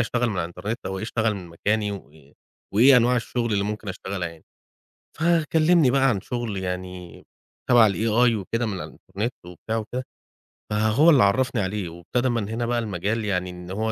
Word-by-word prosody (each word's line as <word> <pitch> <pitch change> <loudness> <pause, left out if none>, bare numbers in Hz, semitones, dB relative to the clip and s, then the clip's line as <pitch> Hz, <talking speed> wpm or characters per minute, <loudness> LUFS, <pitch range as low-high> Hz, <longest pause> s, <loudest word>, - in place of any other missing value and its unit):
أشتغل 120 +1 0
من 110 - -2
على 90 - 0
الإنترنت 90 +7 -5
أو 95 0 -3
إيه - - -4
أشتغل 110 -1 0
من 90 -3 -8
مكاني 105 +5 -1
وإيه 75 -6 -12 0.4
وإيه 125 +5 +7
أنواع 125 +1 +4
الشُغل 120 -1 -2
اللي 100 -1 +1
ممكن 105 0 -4
أشتغلها 95 -1 -4
يعني. 85 -1 -15 0.8
فكلِّمني 165 -2 +3
بقى 135 0 +3
عن 100 -5 0
شُغل 120 -5 -4
يعني 90 -1 -6 0.5
تَبَع 120 -3 +7
ال 100 - 0
AI 115 +2 +2
وكده 115 +5 -2
من 110 - -2
على 95 - -5
الإنترنت 115 +5 -5
وبتاع 90 +6 -5
وكده، 120 +4 -4 0.7
فهو 110 +9 +4
اللي 135 -9 +6
عرفني 115 +2 +2
عليه 95 -1 -3
وابتدى 85 +10 -2
من 115 -4 -1
هنا 115 +2 -2
بقى 120 0 0
المجال 105 +1 -2
يعني 90 -3 -1
إن 90 0 -9
هو 110 +3 -1
110 Hz, 185 wpm, -24 LUFS, 95-120 Hz, 0.8 s, وإيه